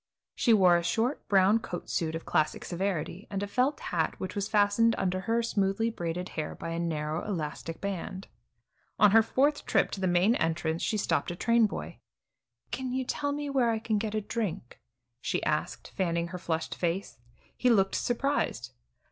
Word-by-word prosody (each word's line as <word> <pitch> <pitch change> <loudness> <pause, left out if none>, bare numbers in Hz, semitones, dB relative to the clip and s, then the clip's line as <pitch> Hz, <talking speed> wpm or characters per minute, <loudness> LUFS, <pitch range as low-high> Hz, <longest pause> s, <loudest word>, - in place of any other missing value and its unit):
She 240 - +2
wore 185 -5 +6
a 170 - -2
short, 225 +10 -1
brown 200 +2 +5
coat 175 -5 -6
suit 160 -1 -1
of 165 - -6
classic 155 0 0
severity, 185 0 -3
and 200 0 -2
a - - -2
felt 255 +7 +1
hat 165 -3 -1
which 185 -1 -4
was 200 -1 -2
fastened 215 +2 +3
under 185 -1 0
her 230 +4 0
smoothly 215 0 0
braided 175 -2 -4
hair 155 -1 -4
by - - -6
a 165 0 -3
narrow 155 -2 -2
elastic 165 -3 -4
band. 195 0 -4 0.7
On 210 -1 +6
her 225 +2 +7
fourth 285 +6 +1
trip - - +2
to 195 - -5
the 185 - +2
main 180 +5 +4
entrance 165 0 -1
she 215 - 0
stopped 205 - 0
a 175 - -4
train 230 +3 +3
boy. - - -7 0.7
"Can 260 -1 -3
you 260 0 -1
tell 285 +3 -1
me 290 0 -3
where 255 -4 +3
I 225 - +1
can 220 -1 -1
get 215 0 -3
a 215 - 0
drink?" 205 - -4 0.4
she - - -1
asked, - - -2
fanning 170 -2 0
her 180 +1 -6
flushed 160 -2 -2
face. 175 - -2 0.4
He 250 - +2
looked 195 -5 +3
surprised. 245 - -1
195 Hz, 185 wpm, -29 LUFS, 170-230 Hz, 0.7 s, her